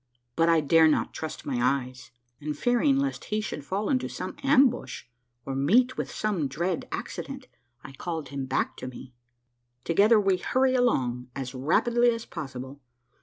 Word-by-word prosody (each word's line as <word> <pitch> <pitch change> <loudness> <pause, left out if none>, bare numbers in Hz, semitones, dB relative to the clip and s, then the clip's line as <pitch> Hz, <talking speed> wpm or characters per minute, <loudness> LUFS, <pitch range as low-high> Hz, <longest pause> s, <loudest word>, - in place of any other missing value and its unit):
But 165 0 +3
I 165 -1 +4
dare 160 +2 +5
not 155 - +1
trust 155 -1 -6
my 130 -4 -2
eyes, 130 0 -1 0.3
and 150 0 -4
fearing 245 - +2
lest 275 0 -2
he 215 - -1
should 210 -8 -5
fall 195 +7 -2
into 260 -2 0
some - - -6
ambush 270 -3 +2 0.4
or 135 - -3
meet 225 - +3
with - - -3
some 195 -9 -1
dread 170 +7 -2
accident, 275 -1 -6 0.4
I - - -9
called 160 +1 -5
him 140 -2 -4
back - - -1
to - - -6
me. 125 0 -10 0.7
Together 210 +6 +4
we 195 -2 +2
hurry 260 +6 +1
along 125 - +1
as 135 -2 -5
rapidly 235 - +2
as 230 -1 -2
possible. 135 -3 -7
165 Hz, 165 wpm, -27 LUFS, -, 0.7 s, dare